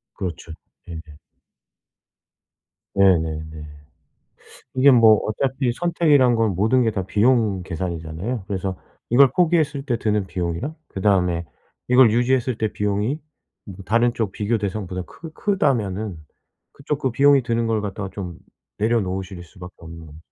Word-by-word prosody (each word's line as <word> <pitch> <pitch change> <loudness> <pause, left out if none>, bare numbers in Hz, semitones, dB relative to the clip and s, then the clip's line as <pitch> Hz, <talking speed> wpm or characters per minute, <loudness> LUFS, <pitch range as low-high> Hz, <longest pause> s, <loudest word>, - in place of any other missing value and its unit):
그렇죠. 85 -3 -6 0.4
예. 85 - -6
네. 80 -2 -11 1.8
네네네. 80 -5 +2 1.3
이게 135 +2 +6
뭐 115 -4 +7
어차피 130 +3 -1
선택이란 145 -6 +3
건 110 -4 +1
모든 110 +7 +2
게 110 - +2
다 95 -3 -3
비용 105 -2 +2
계산이잖아요. 85 +5 -5
그래서 95 -2 -3 0.3
이걸 130 +2 +6
포기했을 155 -5 +1
때 125 -5 0
드는 105 -3 0
비용이랑 90 - -3
그다음에 90 -3 +1 0.4
이걸 125 -3 +6
유지했을 125 0 +1
때 110 -1 -1
비용이 105 +9 -1 0.5
뭐 95 -3 -9
다른 120 +2 +2
쪽 105 -5 -2
비교 110 +2 -1
대상보다 95 -2 -4
크 165 - -11
크다면은 110 - -1 0.6
그쪽 140 +1 -4
그 130 - 0
비용이 140 +2 +4
드는 115 -1 -1
걸 110 -1 0
갖다가 100 -1 -5
좀 90 -4 -7 0.4
내려놓으실 95 -4 -1
수밖에 90 +2 -12
없는 80 -1 -11
거죠. 75 +1 -13
105 Hz, 300 characters per minute, -22 LUFS, 95-125 Hz, 1.8 s, 뭐